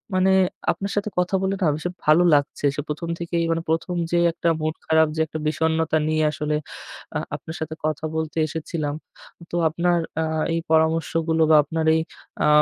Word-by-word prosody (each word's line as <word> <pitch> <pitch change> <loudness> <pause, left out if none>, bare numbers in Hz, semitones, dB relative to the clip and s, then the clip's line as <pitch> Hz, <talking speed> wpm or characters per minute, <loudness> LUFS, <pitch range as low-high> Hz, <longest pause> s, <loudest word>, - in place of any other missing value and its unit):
মানে 190 +1 +4 0.4
আপনার 200 0 -4
সাথে 205 +1 -1
কথা 180 +2 +1
বলে 190 +1 0
না 175 - +3
ভীষণ 175 +4 -4
ভালো 155 +3 +6
লাগছে। 145 0 -1
সে - - -2
১ম, 160 +3 -4
থেকেই 170 0 -1
মানে 165 0 0
১ম, 165 +2 0 0.2
যে 175 - +3
একটা 170 0 0
মুড 155 +1 -1
খারাপ, 160 0 +4
যে - - -3
একটা 155 - -5
বিষন্নতা 160 +1 +1
নিয়ে 155 0 +1
আসলে 150 0 -2 0.6
আ - - 0 0.2
আপনার 160 - -8
সাথে 160 0 -4
কথা 155 0 -1
বলতে 160 0 -3
এসেছিলাম। 155 -1 -3 0.6
তো - - -3
আপনার 170 +2 +1 0.2
আ - - 0 0.3
এই 165 - +1
পরামর্শগুলো 160 0 +2
বা - - +8
আপনার 160 +2 -2
এই 160 - +2 0.4
আ - - +4
160 Hz, 180 wpm, -23 LUFS, 155-170 Hz, 0.6 s, বা